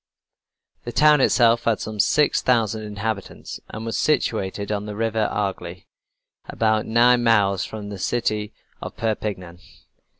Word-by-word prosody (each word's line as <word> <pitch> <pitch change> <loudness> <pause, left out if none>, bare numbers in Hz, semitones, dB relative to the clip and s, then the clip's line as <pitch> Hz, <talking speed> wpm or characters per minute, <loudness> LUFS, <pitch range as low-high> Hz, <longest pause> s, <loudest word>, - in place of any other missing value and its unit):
The 120 - -6
town 150 +3 +5
itself 115 -2 +3
had 115 -2 +1
some 110 -1 -6
six 145 +8 +2
thousand 115 -3 +1
inhabitants, 105 -1 -5
and 110 +1 -7
was 115 -2 -2
situated 100 -8 -1
on 105 0 -3
the 105 - -6
River 110 -1 0
Agly, 95 -3 -4 0.6
about 110 -1 0
nine 120 +2 +4
miles 100 -5 +2
from 105 -2 -8
the 100 -2 -7
city 105 -1 -1 0.3
of - - -8
Perpignan. 100 -6 -4
110 Hz, 135 wpm, -22 LUFS, 100-115 Hz, 0.6 s, town